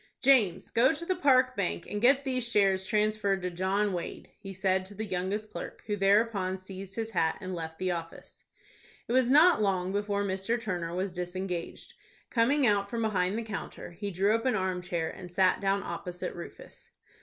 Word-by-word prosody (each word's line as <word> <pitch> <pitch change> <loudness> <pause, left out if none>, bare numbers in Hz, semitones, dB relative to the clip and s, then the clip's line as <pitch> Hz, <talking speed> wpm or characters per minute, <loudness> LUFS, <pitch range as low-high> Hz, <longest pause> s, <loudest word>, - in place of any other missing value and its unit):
"James, 245 -10 +3
go 240 +3 +4
to 335 +4 -6
the 370 - 0
Park 255 -6 +4
Bank, 85 0 -2
and 205 - -4
get 270 +3 +5
these 255 -2 -1
shares 195 -5 +2
transferred 210 -2 +1
to 180 - -2
John 190 +3 0
Wade," 175 - -6
he 195 -2 -8
said 190 0 0
to 205 - -10
the 220 +2 -3
youngest 200 +3 -3
clerk, - - -7
who 210 - -1
thereupon 195 -1 +2
seized 190 0 -9
his 225 -1 -3
hat 160 -6 +1
and 185 0 -5
left 160 -2 -6
the 185 -1 -1
office. 165 -1 -7 0.6
It 235 - -2
was 255 -1 +3
not 310 0 +6
long 190 -2 0
before 205 0 -1
Mr. 195 +4 -1
Turner 175 -6 -3
was 185 0 -2
disengaged. 180 0 -5 0.4
Coming 260 +4 +3
out 200 -3 +2
from 230 0 -2
behind 195 -2 0
the 230 - -2
counter, 215 -5 -7
he 200 +4 -5
drew 195 +3 +2
up 225 +3 0
an 255 - +2
arm 185 -2 -1
chair, 170 -2 -2
and 180 0 -9
sat 185 +1 +2
down 195 0 +1
opposite 180 -1 -5
Rufus. 170 - -11
195 Hz, 190 wpm, -29 LUFS, 185-225 Hz, 0.6 s, not